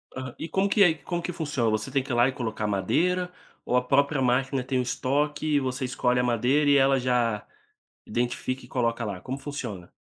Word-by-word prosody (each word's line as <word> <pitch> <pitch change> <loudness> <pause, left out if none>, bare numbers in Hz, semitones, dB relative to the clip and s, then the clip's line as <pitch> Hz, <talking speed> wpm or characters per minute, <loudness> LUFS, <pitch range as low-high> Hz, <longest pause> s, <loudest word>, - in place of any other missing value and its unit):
Aham, 130 -1 -6
e 165 - -6
como 195 +1 +1
que 200 0 +5
é 180 - +7
e 160 - 0
como 170 +4 -4
que 180 - -3
funciona? 145 -8 -1
Você 110 +4 -1
tem 135 0 0
que 140 - -7
ir - - 0
lá 120 +2 +5
e - - 0
colocar 110 -4 -3
madeira, 180 - 0 0.3
ou 125 - +2
a - - +4
própria 140 +2 +2
máquina 130 +1 +1
tem 130 +1 -1
o - - +3
estoque 145 +5 -1
e - - +5
você 130 0 -2
escolhe 125 -1 +1
a - - +2
madeira 125 +5 +2
e 140 - +6
ela 135 0 +4
já 120 -4 0 0.6
identifica 125 +3 -2
e - - -16
coloca 115 -2 -1
lá, 100 -3 -5
como 130 +6 -5
funciona? 120 -12 -6
130 Hz, 225 wpm, -26 LUFS, 120-145 Hz, 0.6 s, é